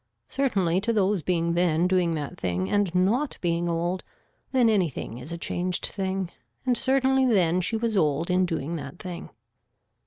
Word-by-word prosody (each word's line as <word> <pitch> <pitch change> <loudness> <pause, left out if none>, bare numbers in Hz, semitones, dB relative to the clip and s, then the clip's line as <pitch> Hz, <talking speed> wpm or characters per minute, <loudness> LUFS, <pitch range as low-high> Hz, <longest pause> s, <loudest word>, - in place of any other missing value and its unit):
Certainly 195 -10 +1
to 230 +3 0
those 200 -3 +2
being 170 0 0
then 170 0 +2
doing 180 -3 +2
that 145 -2 -4
thing 90 +1 -2
and 200 -4 +1
not 230 +10 +1
being 170 0 0
old 175 +2 -1 0.5
then 255 -3 +4
anything 170 - 0
is 135 +6 -9
a 170 - -4
changed 180 +1 -2
thing 190 -2 -3 0.3
and 250 - +3
certainly 265 +2 +2
then 185 -8 +3
she 225 +5 -1
was 225 -1 -1
old 160 -1 +1
in 180 0 +3
doing 165 -1 -3
that 140 +1 -8
thing. 175 -2 -7
180 Hz, 165 wpm, -26 LUFS, 170-205 Hz, 0.5 s, then